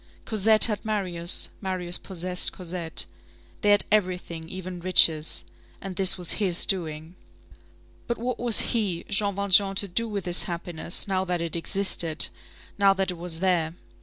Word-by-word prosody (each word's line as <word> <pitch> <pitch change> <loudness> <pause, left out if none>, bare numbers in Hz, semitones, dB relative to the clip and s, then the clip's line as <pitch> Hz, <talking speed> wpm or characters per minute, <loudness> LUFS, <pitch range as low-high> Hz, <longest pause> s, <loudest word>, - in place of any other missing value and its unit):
Cosette 215 0 +4
had 210 -3 +2
Marius, 185 -5 0
Marius 185 -3 -2
possessed 180 -1 -1
Cosette. 175 -2 -4 0.6
They 205 - +2
had 205 0 +5
everything, 180 -5 -1
even 185 -1 -7
riches. 165 -3 +4 0.4
And 195 -2 -7
this 190 0 +3
was 180 -2 -1
his 180 -4 +2
doing. 160 -3 -2 0.9
But 235 - -2
what 245 +1 -4
was 235 -2 +3
he, 200 -7 -1
Jean 200 -1 +1
Valjean, 200 0 +3
to 200 - +2
do 230 +6 -1
with 200 -2 -4
this 175 0 +3
happiness, 170 0 -4
now 190 -1 0
that 180 -1 -2
it 170 0 -4
existed, 170 -2 0 0.5
now 195 -1 +5
that 190 -1 -1
it 180 - -8
was 170 -1 -4
there? 170 -4 +1
185 Hz, 155 wpm, -25 LUFS, 170-200 Hz, 0.9 s, had